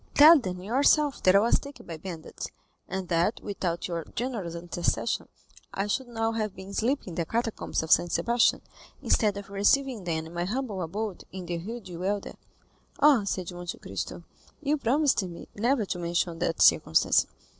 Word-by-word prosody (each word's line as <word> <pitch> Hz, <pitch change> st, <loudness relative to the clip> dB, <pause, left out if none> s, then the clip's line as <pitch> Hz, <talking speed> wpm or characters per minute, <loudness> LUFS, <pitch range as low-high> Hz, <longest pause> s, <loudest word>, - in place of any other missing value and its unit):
Tell 310 Hz, +2 st, +9 dB
them 180 Hz, -6 st, -5 dB
yourself 280 Hz, +5 st, +3 dB
that 185 Hz, +1 st, +5 dB
I -, -, +8 dB
was 230 Hz, -, +3 dB
taken 280 Hz, 0 st, -11 dB
by 165 Hz, -, -6 dB
bandits, 165 Hz, -1 st, -7 dB, 0.4 s
and 190 Hz, -1 st, -3 dB
that 170 Hz, +5 st, +1 dB
without 180 Hz, -4 st, -3 dB
your 170 Hz, -2 st, -3 dB
generous 220 Hz, -9 st, -3 dB
intercession 175 Hz, 0 st, -1 dB, 0.5 s
I 195 Hz, -, 0 dB
should 250 Hz, +5 st, -1 dB
now 225 Hz, -1 st, -1 dB
have 215 Hz, -3 st, -2 dB
been 190 Hz, +1 st, -9 dB
sleeping 245 Hz, +1 st, 0 dB
in -, -, -7 dB
the 170 Hz, -, -1 dB
Catacombs 225 Hz, -6 st, -2 dB
of 160 Hz, -, -5 dB
St. 175 Hz, -, +5 dB
Sebastian, 235 Hz, 0 st, +2 dB, 0.4 s
instead 210 Hz, -3 st, +2 dB
of 200 Hz, 0 st, -8 dB
receiving 220 Hz, +2 st, +2 dB
them 160 Hz, -2 st, -2 dB
in 165 Hz, -, -11 dB
my 175 Hz, 0 st, -2 dB
humble 215 Hz, -2 st, -3 dB
abode 200 Hz, +3 st, -4 dB
in 185 Hz, -1 st, -7 dB
the 170 Hz, -1 st, -3 dB
Rue 230 Hz, +7 st, -6 dB
du 175 Hz, -4 st, -9 dB
Helder." 200 Hz, +2 st, -2 dB, 0.7 s
"Ah," 280 Hz, -8 st, +5 dB
said 185 Hz, -2 st, -3 dB
Monte 175 Hz, 0 st, -6 dB
Cristo -, -, -6 dB, 0.4 s
"you 300 Hz, 0 st, +1 dB
promised 280 Hz, 0 st, +2 dB
me 175 Hz, -3 st, -8 dB
never 235 Hz, +2 st, +1 dB
to 180 Hz, -, -4 dB
mention 170 Hz, 0 st, -1 dB
that 165 Hz, -1 st, +1 dB
circumstance." -, -, +4 dB
200 Hz, 175 wpm, -27 LUFS, 175-235 Hz, 0.7 s, Tell